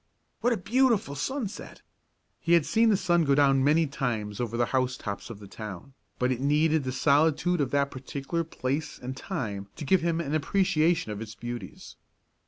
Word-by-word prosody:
What 245 - +2
a 235 - +2
beautiful 225 - +2
sunset!" 225 - -5 0.6
He 170 - +1
had 170 -4 +5
seen 225 0 +3
the 205 - +4
sun 175 -3 +2
go 140 -2 +3
down 135 -2 +4
many 155 +4 +4
times 115 -7 -3
over 115 -1 -2
the 120 - +3
housetops 125 -6 -2
of 115 - -7
the 100 -1 -12
town, 105 +4 -8 0.2
but 125 +1 +1
it 125 0 -2
needed 150 +1 +2
the 130 - -1
solitude 150 +5 +2
of 135 - 0
that 140 0 +1
particular 140 +5 -4
place 150 0 -3
and 130 +1 -6
time 110 - -4
to 150 - -6
give 185 +5 +3
him 170 0 0
an 150 -3 -3
appreciation 165 - +1
of 105 0 -5
its 110 0 -7
beauties. 120 -5 -8
140 Hz, 185 wpm, -27 LUFS, 125-170 Hz, 0.6 s, had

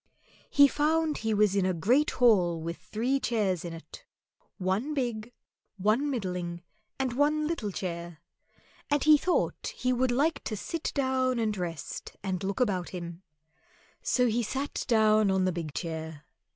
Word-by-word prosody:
He 285 0 +7
found 310 +2 +1
he 220 0 -1
was 210 -2 +3
in 200 - +2
a 185 -1 +1
great 245 - +3
hall 185 -9 +3
with 165 +1 -5
three 230 +9 -1
chairs 205 -9 0
in 170 - -5
it 165 0 -11 0.5
one 200 +11 -1
big, 240 -4 -2 0.5
one 215 +9 +2
middling, 180 -8 -3 0.3
and 265 -2 -1
one 300 +3 +2
little 300 -10 -2
chair; 170 -3 -5 0.7
and 290 -1 +2
he 305 0 +8
thought 355 +5 0
he 255 0 0
would 255 +1 +1
like 285 +7 +1
to 215 - -3
sit 330 +10 -3
down 260 -2 +1
and 220 -2 0
rest 170 -6 -6
and 190 -1 -2
look 195 0 -2
about 195 -8 0
him; 170 -1 -7 0.8
so 250 - +2
he 235 0 +1
sat 270 +6 -3
down 215 -3 +4
on 190 -1 +2
the 185 - +2
big 165 -3 -4
chair. 160 -1 -5
215 Hz, 160 wpm, -29 LUFS, 180-260 Hz, 0.8 s, he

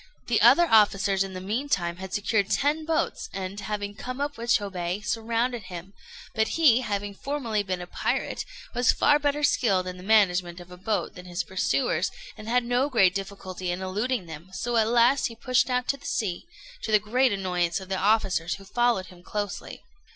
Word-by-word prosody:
The 235 -3 +1
other 260 +10 +7
officers 200 -4 +4
in 195 -1 -7
the 185 - -5
mean 220 +10 -3
time 175 -7 0
had 190 0 -8
secured 205 0 0
ten 300 +3 +1
boats, 320 0 -1
and, 195 +1 -5
having 205 0 -4
come 255 +5 -6
up 290 0 -2
with 235 -1 -6
Chôbei, 195 -3 0
surrounded 230 0 -1
him; 185 +1 -9 0.4
but 220 +6 0
he, 265 -7 +5
having 205 -3 -3
formerly 235 -3 -2
been 185 -2 -3
a - - -5
pirate, - - -2 0.3
was 245 -1 +4
far 290 0 +3
better 295 0 0
skilled 205 -10 +2
in 180 0 -6
the - - -10
management 185 -4 +3
of 175 0 -13
a - - -9
boat 205 +4 -2
than 180 -1 -11
his 175 +1 -2
pursuers, 190 +7 0 0.3
and 215 +1 -9
had 250 +1 +3
no 245 +4 +1
great 195 -9 +4
difficulty 190 -2 -5
in 180 +2 -2
eluding 210 +3 -1
them; 165 +2 -10
so 235 +6 -2
at 220 -1 +3
last 240 +4 +4
he 230 - -10
pushed 255 +3 +1
out 250 0 0
to 275 - -1
sea, 205 - -2 0.3
to 220 - -4
the 215 - +7
great 240 +5 +2
annoyance 180 -3 0
of 190 - -10
the 190 - -2
officers, 190 -4 +1
who 195 - -13
followed 240 -2 +1
him 180 -1 -15
closely. 205 +2 -5
205 Hz, 195 wpm, -26 LUFS, 185-245 Hz, 0.4 s, other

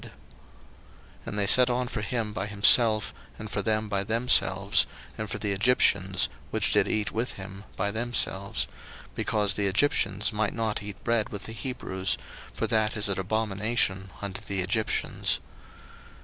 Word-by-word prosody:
01:043:032 - - -10 1.2
And 105 - -4
they 100 - +2
set 125 +5 +5
on 125 0 0
for 115 - -4
him 110 -1 -2
by 105 -1 -3
himself, 110 +1 +5 0.2
and 110 -1 -8
for 100 - -1
them 110 +1 0
by 100 -1 -1
themselves, 100 -3 +2 0.3
and 110 -1 -5
for - - -4
the 105 - -2
Egyptians, 100 -3 +3 0.2
which - - 0
did - - +3
eat 105 -1 -1
with 115 +3 -2
him, 95 +1 -9
by 100 +1 -1
themselves: 110 -3 0 0.5
because 105 -2 +1
the 100 0 0
Egyptians 105 -1 +1
might 105 -1 -1
not 110 -3 -1
eat 105 -1 -9
bread 115 -2 +1
with 100 - -6
the 110 - -6
Hebrews; 100 -5 -2 0.3
for - - -2
that 110 0 +1
is 105 -1 +2
an 95 - -1
abomination 100 -1 0
unto 100 +1 -4
the 100 -3 -2
Egyptians. 105 +4 0
105 Hz, 160 wpm, -27 LUFS, 100-110 Hz, 1.2 s, set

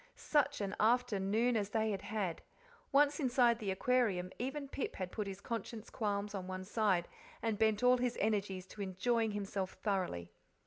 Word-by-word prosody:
Such 285 -4 +1
an 200 0 -2
afternoon 230 0 +2
as 205 -2 0
they 220 0 +1
had 195 -2 -3
had! 200 -5 -2 0.5
Once 290 +2 +4
inside 240 -4 +3
the 210 -4 -3
Aquarium, 190 -3 +1
even 275 +3 -3
Pip 275 - -4
had 185 -1 -4
put 210 -2 -3
his 195 -1 -6
conscience 230 0 -5
qualms 205 -1 -1
on 190 -2 -4
one 185 0 -4
side, 195 -4 +1 0.4
and 220 -2 0
bent 220 0 +3
all 250 0 +6
his 245 -1 0
energies 200 -3 0
to 210 - -8
enjoying 215 +4 0
himself 195 -2 -3
thoroughly. 180 - -1
210 Hz, 170 wpm, -35 LUFS, 195-240 Hz, 0.5 s, all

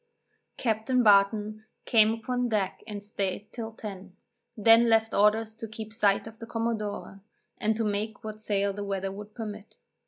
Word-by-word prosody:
Captain 235 +2 +1
Barton 210 +1 +4 0.2
came 220 -2 +5
upon 245 +2 -2
deck 205 -4 -1
and 205 -2 -6
staid 200 -1 -4
till 225 -2 -5
ten; 195 -4 -9 0.4
then 225 +2 +6
left 225 0 +3
orders 215 +2 +3
to 225 0 -7
keep 220 0 -8
sight 205 -3 +2
of 225 0 -11
the 230 - -8
commodore, 220 -4 -3 0.4
and 220 0 +1
to 225 - -1
make 210 +1 -2
what 215 0 -7
sail 200 -2 0
the 205 +1 -5
weather 195 -1 -2
would 210 +2 -10
permit. 215 -2 -7
215 Hz, 160 wpm, -28 LUFS, 205-225 Hz, 0.4 s, then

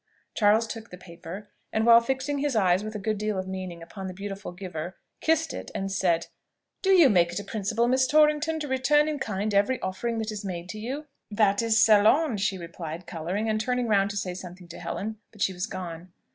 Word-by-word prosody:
Charles 215 +1 +4
took 225 0 -7
the 180 - -10
paper, 180 +3 -10 0.2
and 220 0 +1
while 235 0 +8
fixing 265 +3 -2
his 285 -3 0
eyes 185 -2 +3
with 215 0 -6
a - - -1
good 210 +1 -2
deal 215 -1 -1
of 185 0 -3
meaning 185 -3 -6
upon 190 +3 -7
the 185 - -7
beautiful 195 0 -6
giver, 175 -1 -6 0.2
kissed 320 -1 +1
it, 95 0 -6
and 195 0 -2
said, 175 -4 +1 0.6
"Do 385 - 0
you 360 -6 +7
make 175 -6 +3
it 175 - -3
a - - -6
principle, 215 +3 -1
Miss 260 +1 +3
Torrington, 305 +2 +3
to 295 - -3
return 285 +3 +3
in 300 -2 -2
kind 210 -2 -2
every 205 +6 +2
offering 225 +5 -2
that 220 0 -2
is 210 -1 -6
made 180 -2 -5
you?" 255 +8 -5 0.2
"That 205 -1 +2
is 225 -1 +2
selon," 220 +5 +5
she 195 -1 0
replied, 170 0 -7
colouring, 180 +6 -3
and 215 0 +1
turning 250 +1 0
round 200 -2 +3
to 200 - -4
say 185 -2 -2
something 180 0 -10
to 170 - -9
Helen: 215 +1 -4
but 215 - -18
she 190 - +1
was 180 +3 -3
gone. 180 -2 -7
205 Hz, 215 wpm, -27 LUFS, 185-235 Hz, 0.6 s, while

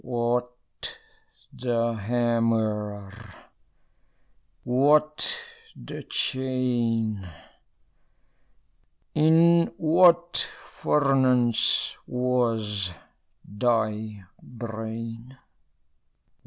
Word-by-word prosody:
What 120 0 -2 1.0
the 115 -2 -1
hammer? 110 -3 -1 1.5
what 150 - +3 0.3
the - - -9
chain? 120 -6 -1 1.8
In 165 +2 +4
what 175 +1 +4 0.4
furnace 130 -5 +2
was 115 -7 -1 0.5
thy 110 -2 -1 0.2
brain? 115 +1 -7
120 Hz, 45 wpm, -25 LUFS, 110-130 Hz, 1.8 s, In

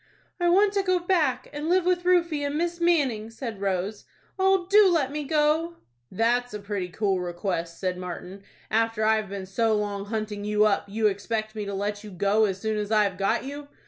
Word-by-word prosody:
"I 350 0 +2
want 395 +3 +4
to 400 - +2
go 370 -1 +2
back, 340 -8 +1
and 295 +2 -3
live 365 0 +3
with 355 -1 +1
Rufie 340 -5 +2
and 285 +1 -1
Miss 345 +1 -1
Manning," 275 -11 +2
said 225 -3 -7
Rose. 195 +1 -2 0.3
"Oh, 380 -1 +3
do 405 0 +6
let 305 -6 +1
me 300 0 -3
go!" 310 +3 +1 0.4
"That's 240 +3 0
a - - -4
pretty 200 -3 -4
cool 195 +1 0
request," 175 -1 -3
said 185 -1 -2
Martin. 180 +2 -7 0.3
"After 225 0 +1
I've 215 -2 +2
been 195 -1 -5
so 220 +3 +1
long 205 -1 -2
hunting 210 -1 -4
you 210 0 +2
up, 205 -2 +1
you 220 +2 -1
expect 215 +2 -1
me 210 -2 -4
to 200 0 -4
let 205 +1 -3
you 210 - -8
go 200 +3 +2
as 190 -2 -2
soon 220 0 -1
as 210 0 -4
I've 210 -3 +3
got 200 +4 +1
you. 285 +2 -7
220 Hz, 205 wpm, -26 LUFS, 200-300 Hz, 0.4 s, do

